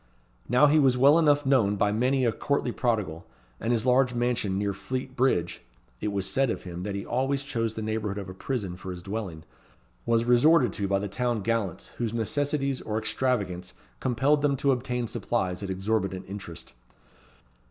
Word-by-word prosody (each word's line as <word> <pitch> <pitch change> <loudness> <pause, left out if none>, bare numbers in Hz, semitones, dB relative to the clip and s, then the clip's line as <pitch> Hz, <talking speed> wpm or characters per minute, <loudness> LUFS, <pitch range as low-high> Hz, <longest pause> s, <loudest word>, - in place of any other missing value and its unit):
Now 125 +4 +5
he 150 +2 +5
was 130 -3 +4
well 140 +5 +6
enough 145 -2 +3
known 120 -7 +3
by 100 0 +2
many 130 +4 +1
a 115 - +3
courtly 135 +2 -1
prodigal, 105 -11 -1 0.3
and 115 - -1
his 115 -1 +1
large 125 0 +3
mansion 120 -5 0
near 100 0 0
Fleet 130 +5 -5
Bridge 120 -10 +1 0.4
(it - - -3
was 100 -2 -1
said 135 +3 +1
of - - -3
him 90 -1 -7
that 100 +1 -4
he 100 - -4
always 135 +3 0
chose 115 -5 -2
the 110 - -4
neigbourhood 110 -2 -2
of 100 -2 -5
a 95 - -7
prison 100 -3 -3
for 95 - -8
his 90 -1 -6
dwelling) 95 -6 -5 0.6
was 115 0 +2
resorted 125 - +5
to 100 - -2
by 100 0 +2
the 100 +1 -3
town 115 +3 -1
gallants 105 -5 -2
whose 115 -2 -2
necessities 140 +3 -1
or 110 0 -3
extravagance 100 -7 -1 0.3
compelled 135 +5 +2
them 140 -2 +2
to 140 +1 +2
obtain 125 -1 -1
supplies 95 -5 -2
at 100 - -5
exorbitant 95 -1 -1
interest. 95 -8 -8
115 Hz, 185 wpm, -27 LUFS, 100-130 Hz, 0.6 s, well